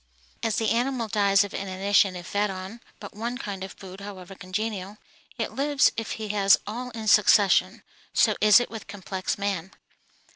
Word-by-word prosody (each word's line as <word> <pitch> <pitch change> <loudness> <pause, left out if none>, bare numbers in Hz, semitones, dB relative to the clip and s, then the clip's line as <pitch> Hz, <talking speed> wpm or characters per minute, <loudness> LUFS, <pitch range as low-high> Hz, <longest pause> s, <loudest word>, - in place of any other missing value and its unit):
As 225 -2 0
the 220 -2 0
animal 240 0 0
dies 200 -1 +3
of 200 - -7
inanition 195 0 +1
if 175 -1 -8
fed 205 +2 0
on 190 +5 -7 0.2
but 205 - -10
one 235 +3 -4
kind 200 -6 -6
of 190 - -7
food, 190 0 -11
however 195 -2 -9
congenial, 195 +1 -4 0.4
yet 225 -2 -3
lives 280 +3 +3
if 225 -1 -4
he 215 -1 -6
has 200 -1 +4
all 245 +4 -5
in 220 -1 -6
succession, 205 -1 +4 0.3
so - - +3
is 210 +2 +7
it 245 - -4
with 225 -1 -8
complex 190 -2 -4
man. 195 -3 -2
205 Hz, 175 wpm, -25 LUFS, 190-225 Hz, 0.4 s, is